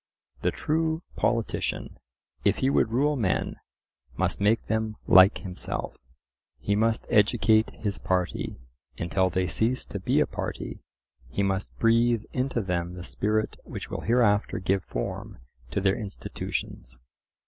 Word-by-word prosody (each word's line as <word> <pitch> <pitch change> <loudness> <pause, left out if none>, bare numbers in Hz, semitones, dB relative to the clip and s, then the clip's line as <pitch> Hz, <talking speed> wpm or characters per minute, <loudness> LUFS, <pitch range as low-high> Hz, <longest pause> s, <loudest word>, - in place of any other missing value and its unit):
The - - +2
true 160 +2 0
politician, 115 -1 -1 0.4
if - - +3
he 135 - +2
would 115 - +3
rule 145 +5 +2
men, 110 -9 0 0.6
must - - 0
make 110 +3 +3
them 110 -1 -1
like 95 +2 +7
himself; 90 -3 -5 0.6
he 100 - 0
must 110 +2 +1
"educate 110 +1 +4
his 100 -5 -4
party" 90 0 -1 0.4
until 95 +2 +1
they 90 +1 0
cease 115 +8 0
to 100 - -5
be 95 - +2
a - - +4
party; - - -5 0.5
he 100 - -1
must 95 0 0
breathe 115 0 +3
into 130 -2 0
them 90 -2 -2
the 90 - -7
spirit 105 +4 -1
which - - -7
will - - -3
hereafter 110 -3 +2
give 95 0 0
form - - -4 0.3
to 75 - -1
their 95 0 +2
institutions. 95 - -5
105 Hz, 135 wpm, -27 LUFS, 95-115 Hz, 0.6 s, like